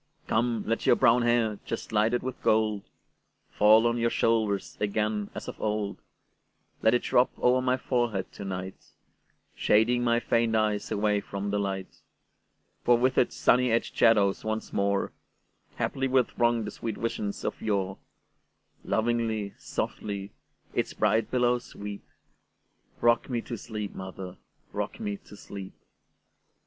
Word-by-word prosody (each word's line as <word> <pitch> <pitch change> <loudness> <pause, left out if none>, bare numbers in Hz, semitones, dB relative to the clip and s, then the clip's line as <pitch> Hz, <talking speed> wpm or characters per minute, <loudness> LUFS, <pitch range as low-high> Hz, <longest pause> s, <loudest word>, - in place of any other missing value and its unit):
Come, 115 -1 0
let 115 +1 -1
your - - +7
brown 125 -1 +4
hair, 120 -3 +2
just 115 - -5
lighted 110 +3 +2
with 130 0 -5
gold, 110 -2 +2 0.7
Fall 110 +2 +6
on 120 0 +1
your 115 0 +2
shoulders 110 -4 +1
again 105 0 0
as - - -6
of - - -7
old; 105 -1 -2 0.8
Let 110 +2 +4
it 120 - 0
drop 125 - +3
over 125 +1 +3
my 130 0 +1
forehead 120 -8 -1
to - - -9
night, 95 -1 -5 0.7
Shading 120 +3 +3
my 120 0 +3
faint 115 -1 +1
eyes 105 -1 +1
away 105 0 +1
from 100 0 -4
the 105 - +1
light; 95 -2 -4 0.8
For 120 -1 +5
with 130 +2 +2
its - - +1
sunny 125 0 +3
edged 115 - 0
shadows 105 -4 +4
once 110 0 -3
moreHaply 100 +6 -3
will 130 -1 +4
throng 120 -2 +1
the 105 - -5
sweet 110 -3 -5
visions 105 -3 -3
of - - -3
yore; 100 -3 -1 0.8
Lovingly, 110 -3 0
softly, 100 -1 -4 0.4
its - - -1
bright 110 +1 +2
billows 125 -1 +2
sweep;—Rock 105 +3 -4
me 120 -2 0
to 120 - -6
sleep, 105 -2 -6
mother,—rock 95 -1 -7
me 100 -1 -3
to 105 - -15
sleep! 100 -2 -9
110 Hz, 135 wpm, -28 LUFS, 100-120 Hz, 0.8 s, your